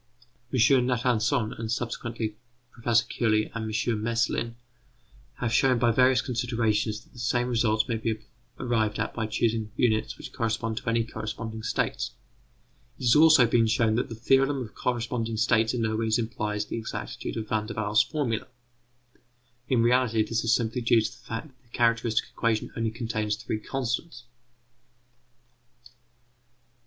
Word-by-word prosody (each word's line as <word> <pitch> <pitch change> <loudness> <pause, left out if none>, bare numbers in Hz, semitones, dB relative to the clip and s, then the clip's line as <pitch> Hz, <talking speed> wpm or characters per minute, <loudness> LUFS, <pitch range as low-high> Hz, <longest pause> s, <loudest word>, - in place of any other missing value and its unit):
M. 125 0 +4
Natanson, 120 -2 +1
and 110 -1 -3
subsequently 115 -2 -3
P. 120 +2 -8
Curie 110 -2 +1
and 110 -1 -4
M. 110 0 0
Meslin, 115 0 0 0.8
have 120 -2 -2
shown 130 +1 +4
by 120 0 +3
various 130 +2 +4
considerations 115 -3 -1
that - - -27
the 120 - -12
same 120 +1 +1
result 110 -2 +1
may 115 -3 -1
be 110 0 -1 0.4
arrived 110 -4 0
at 105 - -2
by 110 -2 -2
choosing 110 -1 0
units 110 -3 +1
which - - -10
correspond 115 -1 -2
to 125 - -3
any 115 0 +2
corresponding 110 0 -6
states; 110 - -2 0.8
it - - -10
has 120 -2 +5
also 155 -4 +7
been 115 0 +3
shown 110 0 +2
that 120 - 0
the 115 - -6
theorem 135 +3 +2
of 110 - -11
corresponding 115 -2 -2
states 110 0 +3
in 115 - -1
no 110 -1 0
way 110 0 -1
implies 105 -2 -2
the 115 - -4
exactitude 110 - -5
of 110 -1 -4
Van 105 0 -1
der 115 - -6
Waals' 110 0 +3
formula. 125 -8 -2 1.2
In 120 -3 +3
reality, 120 -2 +3
this 115 +1 -1
is 115 -1 +4
simply 115 +1 -1
due 115 -1 +4
to 110 - -2
the 130 - -15
fact 125 +5 -5
that 130 -1 -29
the 120 -3 -12
characteristic 115 -1 +2
equation 115 -2 -1
only 115 -1 0
contains 110 -2 -2
three 110 -1 -4
constants. 125 +2 -3
115 Hz, 155 wpm, -27 LUFS, 110-120 Hz, 1.2 s, also